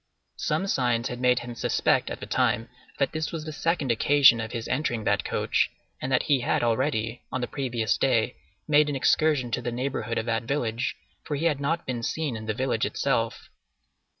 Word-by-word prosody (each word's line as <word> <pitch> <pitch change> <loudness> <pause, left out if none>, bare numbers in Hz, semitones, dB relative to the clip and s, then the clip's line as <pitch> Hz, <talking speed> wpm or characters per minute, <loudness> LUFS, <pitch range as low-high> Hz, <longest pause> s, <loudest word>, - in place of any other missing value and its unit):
Some 195 - 0
signs 120 -9 +1
had 125 0 -6
made 125 0 +3
him 120 0 -7
suspect 115 - +1
at - - -5
the - - -6
time 115 0 +1 0.3
that 140 - +1
this 155 -1 -3
was 160 -2 -5
the 155 - -5
second 150 -3 0
occasion 130 0 +5
of 110 0 -5
his 115 -2 -4
entering 125 -4 -1
that - - +1
coach, - - +1 0.3
and 130 - -3
that 125 - +3
he 140 -3 +3
had 120 - 0
already, 115 -1 0
on 130 - -2
the 120 - -1
previous 120 -6 -1
day, - - +2 0.3
made 150 0 +4
an 145 - -2
excursion 135 -2 +2
to 120 - -1
the 120 0 -3
neighborhood 125 -1 -2
of 115 - -1
that 115 -1 -1
village, 120 -2 -1 0.3
for 150 - -3
he 150 +4 -2
had 150 -5 +2
not 165 +4 -1
been 125 -2 -3
seen 145 +1 -2
in 110 0 -7
the 110 - -1
village 125 -3 0
itself. 115 -4 -1
125 Hz, 205 wpm, -26 LUFS, 115-145 Hz, 0.3 s, occasion